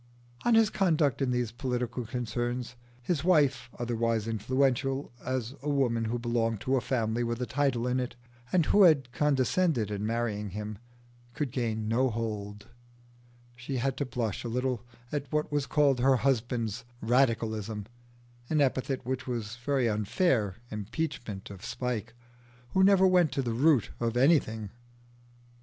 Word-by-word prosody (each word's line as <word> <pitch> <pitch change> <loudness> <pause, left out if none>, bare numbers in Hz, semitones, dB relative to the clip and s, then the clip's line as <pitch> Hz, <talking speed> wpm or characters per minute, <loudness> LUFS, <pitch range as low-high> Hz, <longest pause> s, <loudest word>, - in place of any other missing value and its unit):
On 240 -1 +5
his 225 -2 +5
conduct 160 - +2
in 135 - +1
these 125 -2 0
political 125 -1 -3
concerns, 120 +1 -3 0.3
his 150 +1 -1
wife, 150 -9 +3
otherwise 115 -2 0
influential 130 +4 0
as 130 -1 -2
a 150 - -3
woman 120 -5 +1
who 115 +2 -1
belonged 115 -2 0
to 130 +2 +1
a 130 - +2
family 115 -2 0
with 120 0 -2
a 125 - -1
title 135 -3 0
in 125 +1 +1
it, 125 -1 -3 0.4
and 175 -4 +3
who 205 - +4
had 145 -9 +5
condescended 140 - +1
in 100 0 -3
marrying 110 -2 -1
him, 105 +1 -6 0.6
could 145 -5 -2
gain 110 -4 -2
no 125 +4 +2
hold: 105 -3 -4 0.9
she 120 +2 -4
had 130 +1 0
to 145 - -1
blush 115 -5 -2
a - - -3
little 125 0 -1 0.3
at 145 -2 -3
what 150 0 0
was 145 -2 0
called 145 -4 +3
her 135 +2 +4
husband's 120 -3 0 0.2
"radicalism" 110 -4 +1 0.6
an 155 - +2
epithet 135 -1 0
which 130 +1 -3
was 115 -3 -3
a 120 - -20
very 135 -4 +2
unfair 105 - +1 0.2
impeachment 105 -2 -4
of 100 0 -11
Spike, 115 -1 -3 0.5
who 190 - +3
never 190 -1 +6
went 180 -5 +4
to 135 - 0
the 120 -2 -1
root 135 -1 +3
of 115 0 -1
anything. 115 - +2
125 Hz, 155 wpm, -29 LUFS, 115-140 Hz, 0.9 s, never